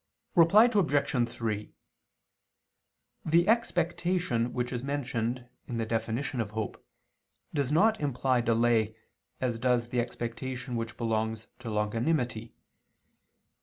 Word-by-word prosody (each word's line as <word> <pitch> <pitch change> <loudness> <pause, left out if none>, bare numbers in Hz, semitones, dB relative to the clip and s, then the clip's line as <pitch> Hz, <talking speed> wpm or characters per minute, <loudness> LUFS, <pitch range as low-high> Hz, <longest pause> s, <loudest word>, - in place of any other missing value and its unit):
Reply 190 +6 +7
Obj. 145 - +2
3: 110 -3 -3 1.5
The 170 +3 +3
expectation 175 - +1
which 125 +1 -2
is 125 0 -3
mentioned 125 -3 -2 0.2
in 120 - -3
the 115 - -1
definition 115 +3 -1
of 110 - -3
hope 110 -1 -5 0.7
does 140 -2 0
not 215 +8 +4
imply 130 -3 +1
delay, 115 -1 +2 0.4
as 120 -3 -1
does 120 -1 +1
the 125 - 0
expectation 125 +2 -4
which 115 +1 -4
belongs 110 -1 -1
to 125 -3 -6
longanimity. 115 +2 -1
120 Hz, 110 wpm, -29 LUFS, 115-145 Hz, 1.5 s, Reply